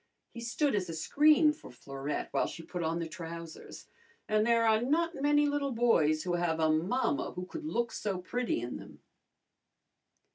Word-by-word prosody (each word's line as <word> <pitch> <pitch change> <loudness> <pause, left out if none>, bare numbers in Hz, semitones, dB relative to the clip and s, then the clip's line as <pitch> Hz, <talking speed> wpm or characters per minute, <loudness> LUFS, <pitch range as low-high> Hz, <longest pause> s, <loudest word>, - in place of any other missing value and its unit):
He 235 - -7
stood 245 +4 0
as 195 -4 -1
a 165 - -4
screen 300 - +4
for 305 - -13
Florette 135 +3 -5
while - - +2
she 165 - -8
put 180 +1 -5
on 165 0 -1
the 165 -1 -3
trousers, 165 0 -8 0.4
and 215 +1 +2
there 230 -1 +4
are 220 0 +4
not 330 +7 +1
many 295 +1 +4
little 285 -2 0
boys 160 -10 +3
who 180 - -2
have 170 -2 0
a 160 -1 +3
mamma 195 - 0
who 180 - -5
could 315 - -7
look 235 -5 -1
so 200 -3 -3
pretty 235 - -2
in 120 +1 -5
them. - - -13
210 Hz, 180 wpm, -31 LUFS, 165-275 Hz, 0.4 s, screen